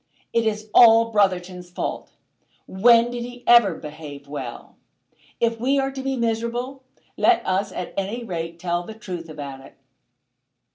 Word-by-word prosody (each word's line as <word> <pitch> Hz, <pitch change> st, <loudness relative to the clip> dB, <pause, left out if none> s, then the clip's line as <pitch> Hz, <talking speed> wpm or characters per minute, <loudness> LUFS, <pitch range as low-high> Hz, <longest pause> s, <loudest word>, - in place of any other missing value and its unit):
It 230 Hz, -1 st, +2 dB
is 215 Hz, 0 st, -3 dB
all 230 Hz, -1 st, +7 dB
Brotherton's 185 Hz, -3 st, 0 dB
fault. 180 Hz, -, -5 dB, 0.5 s
When 235 Hz, +4 st, +4 dB
did 245 Hz, -1 st, -4 dB
he 245 Hz, 0 st, -10 dB
ever 235 Hz, -7 st, +6 dB
behave 150 Hz, -2 st, -10 dB
well? 135 Hz, -4 st, -8 dB, 0.6 s
If 230 Hz, -1 st, 0 dB
we 265 Hz, +4 st, +1 dB
are 270 Hz, 0 st, 0 dB
to 270 Hz, 0 st, -6 dB
be 270 Hz, 0 st, -2 dB
miserable, 235 Hz, +3 st, -2 dB, 0.4 s
let 360 Hz, -1 st, +3 dB
us 190 Hz, +2 st, 0 dB
at 180 Hz, -, -6 dB
any 200 Hz, +5 st, -3 dB
rate 165 Hz, -5 st, -5 dB
tell 175 Hz, 0 st, -1 dB
the 215 Hz, +5 st, -9 dB
truth 180 Hz, -6 st, -7 dB
about 140 Hz, -3 st, -8 dB
it." -, -, -16 dB
210 Hz, 150 wpm, -23 LUFS, 175-235 Hz, 0.6 s, all